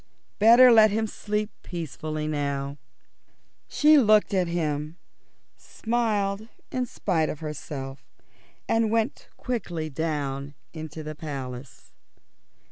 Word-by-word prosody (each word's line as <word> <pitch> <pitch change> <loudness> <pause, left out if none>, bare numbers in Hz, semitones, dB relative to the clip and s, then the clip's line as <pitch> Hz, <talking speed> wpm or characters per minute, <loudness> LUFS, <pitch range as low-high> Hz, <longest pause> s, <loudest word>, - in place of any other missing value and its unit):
Better 240 +4 +8
let 220 -2 +7
him 220 +2 0
sleep 210 0 -3
peacefully 155 -2 -5
now. 140 -1 -2 0.9
She 300 0 +5
looked 215 -4 +4
at 185 -2 +2
him, 155 -2 -2 0.6
smiled 220 -3 -1 0.2
in 255 -1 -1
spite 165 -8 0
of 150 - -6
herself, 140 -3 -6 0.6
and 225 -1 +2
went 225 +4 -1
quickly 175 - -3
down 140 -2 -3 0.2
into 155 -1 -7
the 155 0 -5
Palace. 135 -4 -8
165 Hz, 105 wpm, -26 LUFS, 150-215 Hz, 0.9 s, Better